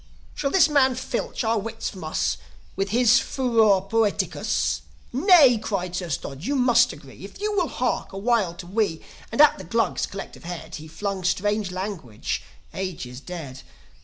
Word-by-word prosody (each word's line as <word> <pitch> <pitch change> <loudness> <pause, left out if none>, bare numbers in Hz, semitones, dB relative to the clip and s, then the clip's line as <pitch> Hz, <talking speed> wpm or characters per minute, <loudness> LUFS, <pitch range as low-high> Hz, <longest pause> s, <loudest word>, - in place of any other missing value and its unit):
"Shall 280 - -1
this 340 +1 +5
man 270 -4 +3
filch 250 0 -3
our 225 0 +1
wits 225 +2 -4
from 185 -4 -10
us 155 - 0 0.4
With 195 0 -1
his 240 +1 +5
furor 225 -7 +3
poeticus? 170 - 0 0.3
Nay!" 280 - +6
cried 180 -4 -3
Sir 180 -1 -3
Stodge. 140 +1 -4
"You 285 - 0
must 245 -2 +4
agree, - - -13
If - - -10
you 420 0 -1
will 360 -4 +2
hark 250 0 -2
a 195 - -7
while 205 -5 +1
to 175 - -9
me 195 -3 -1 0.3
And 230 - -4
at 300 -7 +6
the - - -7
Glugs' 230 +7 0
collective 195 - -8
head 170 -2 -7
He 155 +1 -10
flung 195 +3 -4
strange 205 +3 0
language, 180 - -4 0.3
ages 160 -10 -5
dead. 145 -5 -8
200 Hz, 165 wpm, -24 LUFS, 175-240 Hz, 0.4 s, Nay